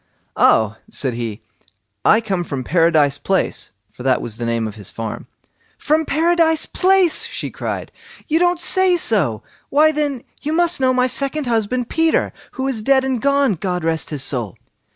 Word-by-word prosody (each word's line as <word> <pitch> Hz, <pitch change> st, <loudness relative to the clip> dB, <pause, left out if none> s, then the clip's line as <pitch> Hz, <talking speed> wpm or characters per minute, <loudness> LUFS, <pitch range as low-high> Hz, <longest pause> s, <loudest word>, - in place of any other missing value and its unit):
"Oh!" 110 Hz, -1 st, +3 dB
said 130 Hz, -3 st, -2 dB
he, 115 Hz, -2 st, -5 dB, 0.6 s
"I 220 Hz, -, +5 dB
come 195 Hz, -5 st, -2 dB
from 140 Hz, -6 st, -4 dB
Paradise 155 Hz, -2 st, +2 dB
Place", 190 Hz, -1 st, -1 dB, 0.2 s
for -, -, -13 dB
that 130 Hz, 0 st, +2 dB
was 110 Hz, -2 st, -7 dB
the 120 Hz, 0 st, -3 dB
name 115 Hz, -1 st, -1 dB
of 105 Hz, -, -7 dB
his 105 Hz, -3 st, -10 dB
farm. 115 Hz, -1 st, -6 dB, 0.5 s
"From 310 Hz, +2 st, +1 dB
Paradise 325 Hz, +1 st, +2 dB
Place!" 375 Hz, -2 st, +2 dB
she -, -, -5 dB
cried, -, -, -5 dB, 0.4 s
"you 320 Hz, +2 st, +2 dB
don't 350 Hz, 0 st, +2 dB
say 370 Hz, 0 st, +2 dB
so! 175 Hz, -, 0 dB, 0.3 s
Why, 305 Hz, +2 st, +4 dB
then, 290 Hz, -5 st, -2 dB, 0.2 s
you 305 Hz, -, -2 dB
must 345 Hz, -2 st, +2 dB
know 260 Hz, 0 st, +4 dB
my 255 Hz, 0 st, +2 dB
second 275 Hz, +3 st, -1 dB
husband 235 Hz, +1 st, 0 dB
Peter, 325 Hz, 0 st, +1 dB, 0.2 s
who 265 Hz, 0 st, -3 dB
is 250 Hz, -5 st, -2 dB
dead 265 Hz, +3 st, +3 dB
and 260 Hz, -3 st, -1 dB
gone, 280 Hz, -4 st, +2 dB
God 180 Hz, 0 st, -3 dB
rest 160 Hz, -1 st, -1 dB
his 145 Hz, -3 st, -4 dB
soul." 120 Hz, -10 st, -3 dB
235 Hz, 175 wpm, -19 LUFS, -, 0.6 s, I